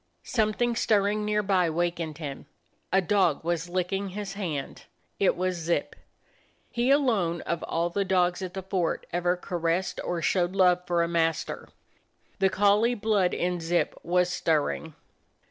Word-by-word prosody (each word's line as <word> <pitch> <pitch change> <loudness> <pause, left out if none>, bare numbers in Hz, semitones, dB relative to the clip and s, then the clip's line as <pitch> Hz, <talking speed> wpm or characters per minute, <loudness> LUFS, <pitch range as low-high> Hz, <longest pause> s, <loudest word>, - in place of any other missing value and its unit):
Something 230 +1 0
stirring 210 -1 +2
near 210 0 +1
by 185 -3 +2
wakened 170 -2 -2
him; 145 -4 -7 0.4
a 190 +2 +4
dog 180 -5 +2
was 170 0 -2
licking 185 +2 -1
his 195 0 -5
hand. 165 -9 -5 0.3
It 195 - +3
was 185 +1 -1
Zip. 170 +1 -1 0.8
He 240 +1 0
alone 225 - +2
of 170 -1 -3
all 170 +1 -1
the 200 +3 0
dogs 180 -1 +1
at 185 -1 -5
the 190 - -4
fort 185 -3 -1
ever 175 +1 +1
caressed 175 +1 -2
or 175 - -2
showed 175 +1 +1
love 180 -1 +3
for 170 -1 +2
a - - 0
master. 165 -1 -1 0.7
The 195 -1 +4
collie 205 +5 +3
blood 210 -4 +1
in 180 0 -1
Zip 170 +1 0
was 180 +1 +1
stirring. 160 -2 -1
180 Hz, 150 wpm, -27 LUFS, 170-200 Hz, 0.8 s, a